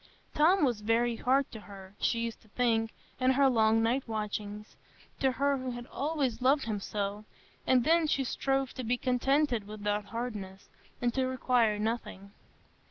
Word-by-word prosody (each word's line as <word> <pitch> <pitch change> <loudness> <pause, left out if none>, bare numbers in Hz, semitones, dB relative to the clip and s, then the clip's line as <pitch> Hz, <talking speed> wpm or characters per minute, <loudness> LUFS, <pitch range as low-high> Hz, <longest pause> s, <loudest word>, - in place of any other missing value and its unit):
Tom 335 +3 +4
was 240 -5 -1
very 230 +2 +1
hard 270 +3 +1
to 220 - -8
her, 195 -2 -12
she 230 - +1
used 230 -1 -4
to 220 - -22
think, 225 0 +1 0.3
in 255 0 +3
her 275 +1 +4
long 225 -2 +3
night 250 +4 0
watchings,—to 210 +4 -4
her 280 +1 +1
who 255 0 -4
had 240 -1 -6
always 280 -4 -2
loved 270 +3 +3
him 215 -3 -2
so; 205 +1 -3 0.4
and 255 -2 +4
then 325 +3 +3
she 275 -2 +1
strove 270 +1 -1
to 255 - -5
be 245 +2 0
contented 255 -2 +1
with 210 0 -9
that 205 0 0
hardness, 210 -5 -6 0.3
and 240 -1 +1
to 260 -1 +1
require 250 -4 +2
nothing. 210 -2 -4
240 Hz, 165 wpm, -30 LUFS, 215-265 Hz, 0.4 s, Tom